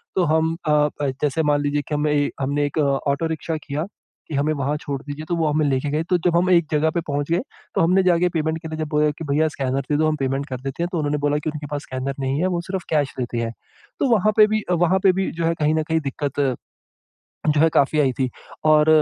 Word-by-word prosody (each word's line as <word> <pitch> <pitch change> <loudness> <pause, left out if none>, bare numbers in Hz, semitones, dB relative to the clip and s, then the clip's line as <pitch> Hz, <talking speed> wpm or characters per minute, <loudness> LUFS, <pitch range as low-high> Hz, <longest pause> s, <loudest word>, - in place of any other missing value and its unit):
तो 185 - +3
हम 160 +1 +2
अ, 150 0 +4 0.3
जैसे 150 +2 +1
मान 145 -1 +2
लीजिए 145 0 0
कि 150 - -2
हमें 150 0 +1
ए 145 -1 +2
हमने 145 +2 0
एक 145 - -5
ऑटो 140 +2 +1
रिक्शा 160 0 -3
किया 145 +2 -2 0.5
कि 150 - -3
हमें 145 +2 +1
वहाँ 140 0 -1
छोड़ 140 -2 -5
दीजिए। 145 +2 -6
तो 175 - +1
वो 165 -2 +1
हमें 150 0 +1
लेके 140 0 0
गए 155 +2 0
तो 180 - +4
जब 170 -1 +3
हम 180 +1 +2
एक 170 -3 +4
जगह 155 +1 +2
पे - - +1
पहुँच 145 +2 -2
गए 170 - +2 0.3
तो - - +3
हमने 185 +3 +4
जाके 180 -1 +3
पेमेंट 160 -1 -1
के 160 - -6
लिए 155 - -5
जब 155 - -2
बोला 150 0 +2
कि 165 - -4
भैया 155 +2 +3
स्कैनर 135 -1 -1
दे 145 - +3
दो 155 +1 +2
हम 155 - +1
पेमेंट 135 +1 -1
कर 130 - -4
देते 135 +5 -3
हैं। 175 - 0
तो 175 - -2
उन्होंने 150 0 0
बोला 145 0 +1
कि 155 +1 -2
उनके 150 -1 -6
पास 145 -1 -2
स्कैनर 130 +1 -4
नहीं 135 +1 -1
है 185 - +2
वो 170 - -2
सिर्फ़ 190 -2 -3
कैश 145 -3 +1
लेते 120 -1 -3
हैं। 115 -1 -1 0.5
तो 275 - +2
वहाँ 215 +1 +3
पे 215 - +8
भी 215 -1 0
वहाँ 175 +2 +3
पे 190 - +7
भी - - -1
जो 165 0 -3
है 165 - +2
कहीं 155 0 +2
न 160 - +1
कहीं 160 - +3
दिक्कत 140 -1 -1 0.9
जो 150 0 +3
है 165 - +6
काफ़ी 145 +2 +3
आई 135 -3 +3
थी। 130 0 -1 0.4
और 155 0 +5
150 Hz, 260 wpm, -22 LUFS, 140-165 Hz, 0.9 s, पे